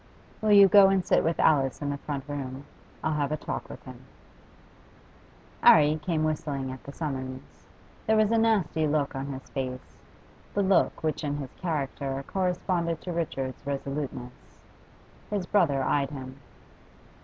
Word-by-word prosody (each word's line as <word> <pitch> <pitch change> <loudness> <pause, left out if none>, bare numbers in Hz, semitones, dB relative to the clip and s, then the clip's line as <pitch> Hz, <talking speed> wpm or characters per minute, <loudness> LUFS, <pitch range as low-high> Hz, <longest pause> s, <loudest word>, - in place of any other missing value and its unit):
'Will 215 -1 +3
you 200 -1 +9
go 200 0 +8
and 190 -2 +1
sit - - +3
with 165 +1 0
Alice 135 -4 +3
in 145 -1 -2
the 140 - -3
front 140 -2 -4
room? 140 -1 -5 0.4
I'll 155 - 0
have 145 -1 -1
a 155 - 0
talk - - -5
with - - -10
him.' - - -11 1.6
'Arry 150 0 +6
came 160 -3 -1
whistling 145 -4 -2
at 130 - -9
the 140 - -8
summons. 130 -4 -6 0.4
There 220 0 +4
was 215 0 +3
a 230 - +3
nasty 195 -9 +2
look 145 -1 0
on 135 +1 -4
his 135 -2 -7
face, 130 -1 -5 0.6
the 200 - +2
look 190 -3 +2
which 155 0 -1
in 145 -1 -2
his 135 -3 -7
character 140 -4 -3
corresponded 180 -3 -1
to 180 - -5
Richard's 135 -6 -3
resoluteness. 140 -3 -5 0.7
His 205 -3 -2
brother 160 -9 +2
eyed 140 -1 +1
him. 135 -2 -8
150 Hz, 155 wpm, -27 LUFS, 135-175 Hz, 1.6 s, you